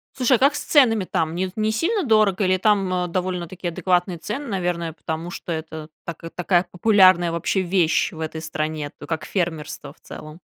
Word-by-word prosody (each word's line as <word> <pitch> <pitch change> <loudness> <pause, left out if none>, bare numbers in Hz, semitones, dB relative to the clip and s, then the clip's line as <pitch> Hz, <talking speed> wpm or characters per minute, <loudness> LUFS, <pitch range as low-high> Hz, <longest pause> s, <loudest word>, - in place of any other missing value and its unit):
Слушай, 255 -1 +3
а - - -14
как 275 +2 +4
с - - -2
ценами 225 -9 +4
там? 160 -2 -1
Не 185 +2 -2
не 215 0 0
сильно 370 - 0
дорого, 215 - +3
или 185 0 +3
там, 195 -1 +2
а, 180 -1 0
довольно-таки 180 0 -3
адекватные 180 0 0
цены, 240 - -5
наверное, 175 -4 -2
потому 160 +2 -5
что 175 - -7
это 160 -1 -6 0.2
така 165 0 -7
такая 180 +1 +1
популярная 185 -3 +5
вообще 170 +3 0
вещь 180 -3 +1
в 160 - -11
этой 160 0 -4
стране, 155 -1 -3
т 145 - -10
как 160 0 -3
фермерство 165 -5 -3
в - - -23
целом? 155 +2 -11
180 Hz, 190 wpm, -22 LUFS, 165-200 Hz, 0.2 s, популярная